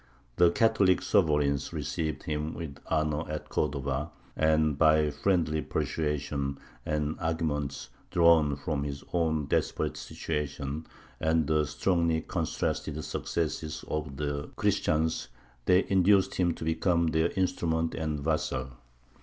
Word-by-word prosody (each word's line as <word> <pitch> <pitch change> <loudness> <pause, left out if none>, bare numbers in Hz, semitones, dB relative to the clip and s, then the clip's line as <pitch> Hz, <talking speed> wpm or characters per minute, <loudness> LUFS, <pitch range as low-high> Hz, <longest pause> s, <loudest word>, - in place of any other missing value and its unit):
The 90 -1 +6
Catholic 95 -3 +3
sovereigns 75 -7 +2
received 80 -3 -3
him 75 0 -3
with 75 -5 -6
honour 75 0 0
at 75 -1 -5
Cordova, 70 +2 -1 0.3
and, 80 -1 +3
by 75 0 +4
friendly 80 -1 +1
persuasion 70 -3 -2 0.3
and 75 0 -1
arguments 80 -4 -2 0.2
drawn 85 -4 +5
from 70 0 -2
his 70 -1 -5
own 80 -3 +1
desperate - - 0
situation 75 0 -4 0.3
and 80 0 +2
the 75 -1 +2
strongly 85 +2 +1
contrasted 75 0 -2
successes 80 0 -3
of 75 -3 -3
the 70 -1 -3
Christians, 80 -4 +1 0.4
they 90 +1 +4
induced 95 0 +4
him 85 -2 +1
to - - -7
become 85 +1 +2
their 80 +1 +2
instrument 80 -3 0
and 75 -2 -2
vassal. 70 -4 -1
80 Hz, 120 wpm, -29 LUFS, 75-80 Hz, 0.4 s, The